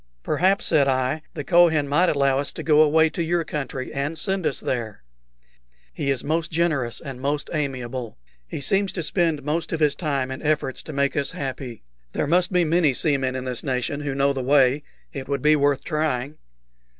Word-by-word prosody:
"Perhaps," 190 +3 +2
said 145 -4 +4
I, 130 +3 0
"the 145 - -4
Kohen 165 -3 +4
might 170 +6 +3
allow 140 -2 +2
us 140 - -3
to - - -6
go 155 -1 +5
away 160 +1 +5
to - - -3
your 170 +1 0
country, 135 -4 -5
and 140 +4 -3
send 190 +1 -1
us - - -2
there. 110 - -4 0.9
He 140 - -3
is 135 -3 0
most 165 +3 -1
generous 155 -8 0
and 130 -2 -8
most 145 +2 -2
amiable. 130 - -4 0.3
He 100 - -6
seems 195 +6 +2
to 175 - -3
spend 165 -4 0
most 155 +4 -2
of 165 - -2
his 150 -2 +3
time 140 -4 -2
in 130 - -6
efforts 150 -3 -1
to - - -8
make 140 0 0
us 140 -2 0
happy. 130 - -6 0.3
There - - 0
must 175 +5 +2
be 180 -1 +3
many 160 -4 +2
seamen 135 -4 +1
in 130 - -3
this 125 -2 -4
nation 130 +2 -2
who 140 -2 -3
know 140 0 +2
the 135 - -3
way. 135 +1 +3 0.3
It 130 - -6
would 140 -2 -2
be 150 0 +5
worth 145 -1 +1
trying." 150 -3 -2
145 Hz, 200 wpm, -23 LUFS, 135-160 Hz, 0.9 s, go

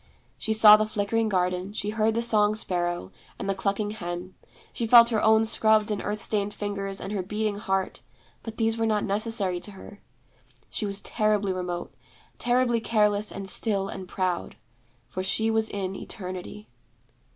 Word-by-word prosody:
She 220 - -4
saw 215 -1 +9
the 215 0 0
flickering 215 +1 -1
garden, 180 0 -1
she 210 0 -2
heard 220 0 +1
the 230 - 0
song 215 -2 +3
sparrow 175 - -3 0.3
and - - -5
the 195 - +1
clucking 200 +2 -2
hen, 180 -2 -6 0.4
she 230 - -3
felt 235 0 +8
her 220 -2 0
own 220 0 +4
scrubbed 220 -1 +3
and 205 - -2
earth 210 +1 -3
stained 205 -1 -1
fingers 200 -1 -4
and 195 - -6
her 205 -2 -1
beating 210 +2 -2
heart, 190 -2 -2 0.4
but 225 -1 -8
these 225 0 0
were 225 - +1
not 215 -1 +1
necessary 200 -3 0
to 205 +3 -9
her. 200 +1 -13 0.7
She 210 - -2
was 200 0 -2
terribly 210 -3 0
remote; 180 -1 -5 0.5
terribly 240 -1 +1
careless 210 -2 +1
and 195 0 -7
still 195 0 +2
and 190 -1 -7
proud; 185 -1 -2 0.5
for 185 - -5
she 220 +4 +1
was 220 0 +1
in 195 -1 -4
Eternity. 185 +2 -8
210 Hz, 170 wpm, -26 LUFS, 190-220 Hz, 0.7 s, saw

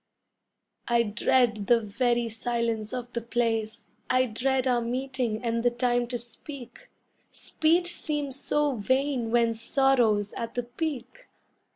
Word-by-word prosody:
I 235 -1 +3
dread 220 -1 +1
the 240 -1 +5
very 235 +2 0
silence 225 -1 -2
of 245 -1 -5
the 235 - -2
place, 225 -2 -2 0.2
I 255 0 +4
dread 255 +3 0
our 245 -2 +2
meeting 250 -2 -2
and 230 -1 0
the 245 - +3
time 245 0 0
to 245 0 -3
speak 245 - -11 0.4
Speech 345 +3 +1
seems 290 -3 -3
so 295 -3 0
vain 260 +2 0
when 230 0 +3
sorrow's 230 -4 +2
at 230 0 -5
the 245 - -1
peak! 280 - -5
240 Hz, 135 wpm, -27 LUFS, 230-265 Hz, 0.4 s, the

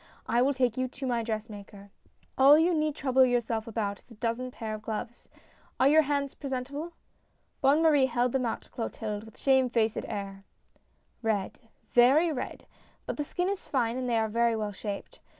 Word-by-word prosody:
I 240 - +2
will 275 +2 +2
take 250 -3 +1
you 255 0 0
to 265 +2 -7
my 240 -2 0
dressmaker. 210 -3 -6 0.4
All 275 +3 +7
you 335 +3 +3
need 305 -2 0
trouble 265 -1 +3
yourself 235 -3 0
about 205 -3 -3
is - - -32
a 230 - -13
dozen 230 +3 -2
pair 225 -3 -6
of 215 - -6
gloves. 225 +2 -6 0.5
Are 260 - +5
your 310 +2 +6
hands 280 -2 -1
pre 280 - -7
sentable? 280 +6 -4 0.3
" - - -43
Bonne 285 +3 +4
Marie 290 -5 +5
held 245 0 0
them 265 0 0
out - - -3
to - - -23
Clotilde 215 -3 -4
with 220 - -15
a - - -23
shame 265 -2 +3
faced 225 -2 0
air. 195 -2 -6 0.4
" - - -42
Red, 200 -3 -3 0.3
very 275 +8 +5
red! 255 - -6 0.4
But - - -4
the 295 - -1
skin 355 +5 -2
is 395 0 -3
fine, 240 -4 0
and 255 -1 -2
they 235 - +2
are 220 0 +1
very 235 +1 +1
well 210 -1 -2
shaped. 200 0 -7
245 Hz, 205 wpm, -28 LUFS, 220-275 Hz, 0.5 s, All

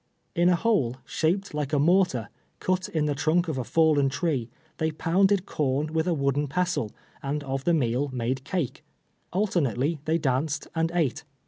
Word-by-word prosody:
In 175 +1 +4
a 180 - +5
hole, 170 - +1
sliaj>ed 185 +4 0
like 150 -1 -3
a - - +4
mortar, 170 - +3 0.3
cut 185 0 0
in 155 -2 0
the 150 - +1
trunk 160 +5 +1
of 150 -5 -2
a - - 0
falK'n 150 -1 +3
tree, 135 -3 -1 0.3
they 160 - +1
pounded 190 +5 +2
corn 150 +2 -1
with 160 +1 +1
a 175 - +2
wooden 140 0 +1
pestle, 175 -8 -1 0.3
and 145 +2 -2
of 135 -1 -3
the 175 - +3
meal 130 0 +1
made 130 +1 -2
cake. 160 -3 -3 0.5
Alternately 165 - 0
they 160 +1 +2
danced 145 0 -1
and 165 0 0
ate. 155 -8 0
155 Hz, 175 wpm, -26 LUFS, 135-175 Hz, 0.5 s, a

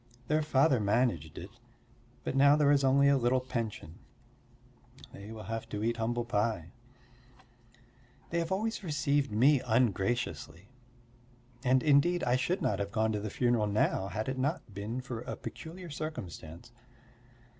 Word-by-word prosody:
Their 155 +1 +3
father 140 -3 +3
managed 100 - 0
it, 90 +4 -8 0.7
but - - -3
now 140 +1 +6
there 150 -1 +4
is 140 -1 +3
only 135 +1 +4
a 140 -1 +4
little 125 +1 +2
pension. 115 -10 -5 1.1
They 100 +2 -10
will 110 -1 -8
have 115 +2 -5
to 105 0 -4
eat 115 +1 0
humble 120 +1 -1
pie. 105 -6 -1 1.6
They 170 - +1
have 165 +1 -3
always 215 +3 -1
received 145 - 0
me 130 +6 +4
ungraciously. 110 -4 -1 0.9
And 130 0 +3
indeed 155 +4 +3
I 120 - +2
should 170 +9 -1
not - - 0
have 100 0 -3
gone 110 +1 +1
to 105 - -1
the 105 +1 -4
funeral 120 -1 +1
now 100 -2 +1
had 110 +2 -4
it 130 0 -3
not 135 - -2
been 105 +6 -4
for 125 -3 -6
a - - -5
peculiar 170 +1 -9
circumstance. 95 - -7
120 Hz, 150 wpm, -31 LUFS, 105-140 Hz, 1.6 s, now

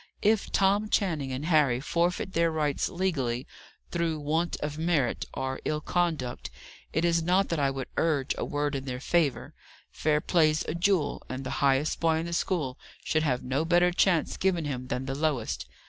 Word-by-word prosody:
If 215 0 +2
Tom 200 +2 +2
Channing 160 -12 0
and 130 +3 -4
Harry 150 -7 +3
forfeit 175 +6 -1
their 165 0 +3
rights 150 -3 0
legally, 135 -9 -1 0.5
through 165 -2 -1
want 160 +4 0
of 150 +1 -3
merit, 160 -7 +1
or 130 0 -3
ill 150 - -1
conduct, 160 -6 -1 0.4
it 160 +2 +1
is 170 -1 +3
not 180 +2 +2
I - - +2
that 135 -2 +1
would 135 -1 -4
urge 145 -5 +1
a - - -3
word 145 0 -1
in 135 -1 -3
their 125 -2 -4
favour. 145 -3 0 0.4
Fair 150 -1 +1
play's 155 -1 +2
a - - -1
jewel: 175 -1 +1
and 130 +1 -4
the 130 - -4
highest 140 +2 +2
boy 165 -1 +2
in 165 - -2
the 170 - -4
school 150 -7 -1 0.2
should 155 - +1
have 130 -5 0
no 135 +4 0
better 175 +1 +4
chance 175 -2 +2
given 180 -4 +1
him 130 -3 -4
than 130 +1 -3
the 135 - -3
lowest. 135 - -1
155 Hz, 185 wpm, -28 LUFS, 135-170 Hz, 0.5 s, better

